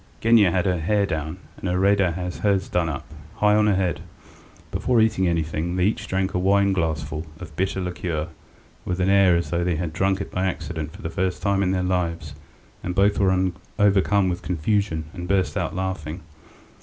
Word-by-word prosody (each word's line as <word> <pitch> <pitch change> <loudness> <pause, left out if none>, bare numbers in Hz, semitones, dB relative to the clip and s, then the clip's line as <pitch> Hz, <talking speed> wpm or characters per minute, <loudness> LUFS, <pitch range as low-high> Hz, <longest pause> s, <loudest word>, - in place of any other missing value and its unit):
Genya 110 -4 +5
had 90 +1 0
her 90 -2 +1
hair 100 +5 +1
down, 80 -1 -3 0.2
and 95 - -4
Iraida 95 0 +3
had 90 +1 -4
hers 100 -3 +1
done 85 -2 0
up 70 - -5 0.3
high 105 -1 +3
on 105 0 +4
her 105 - +3
head. 90 -4 0 0.7
Before 125 -2 +1
eating 110 -4 +3
anything 85 +1 -1
they 90 - +1
each 105 - -1
drank 95 0 -1
a 90 - 0
wineglassful 85 -6 +1
of 75 - -10
bitter 95 +2 -1
liqueur, 90 -3 -3 0.5
with 90 0 -3
an 90 +1 +2
air 100 -3 +5
as 85 - -1
though 85 0 0
they 90 -1 0
had 80 -1 -3
drunk 95 +3 +1
it 100 - -5
by 95 +1 0
accident 80 -4 -4
for - - -13
the 80 - -3
first 95 +1 -2
time 100 -1 +2
in 95 - +1
their 90 -1 0
lives 85 -5 -1 0.5
and 90 - -4
both 100 +1 +3
were 95 -1 +2 0.3
overcome 100 -1 +3
with 90 -1 -2
confusion 90 -1 -1
and 90 -1 -6
burst 95 0 +1
out 85 -5 -2
laughing. 95 -3 -4
90 Hz, 195 wpm, -23 LUFS, 85-100 Hz, 0.7 s, Genya